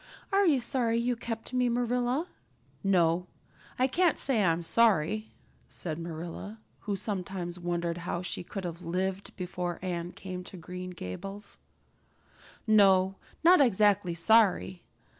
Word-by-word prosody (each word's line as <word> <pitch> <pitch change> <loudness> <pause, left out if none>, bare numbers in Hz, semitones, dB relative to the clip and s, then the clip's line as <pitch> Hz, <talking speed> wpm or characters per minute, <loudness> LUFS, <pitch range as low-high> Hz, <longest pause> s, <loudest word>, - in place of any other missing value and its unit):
Are 395 0 +4
you 290 -5 +4
sorry 235 -1 0
you 240 +1 +1
kept 230 +1 -6
me, 250 -1 +2
Marilla?" 245 +4 0 0.6
"No, 180 -2 +2 0.5
I 255 - +3
can't 340 +5 +2
say 235 -7 +2
I'm 170 -1 +2
sorry," 215 +1 +2 0.4
said 160 -2 -5
Marilla, 170 +6 -7 0.2
who 205 -1 -3
sometimes 185 -3 -4
wondered 175 -1 -2
how 175 0 -3
she 175 - -3
could 195 +2 -6
have 170 0 -5
lived 185 +3 -3
before 180 -1 -4
Anne 175 -1 -3
came 185 -1 -7
to 185 - -9
Green 180 +2 -7
Gables, 195 - -7 1.1
"no, 195 -3 +5 0.3
not 355 0 +7
exactly 205 -7 +3
sorry. 190 -1 +3
190 Hz, 130 wpm, -29 LUFS, 175-230 Hz, 1.1 s, not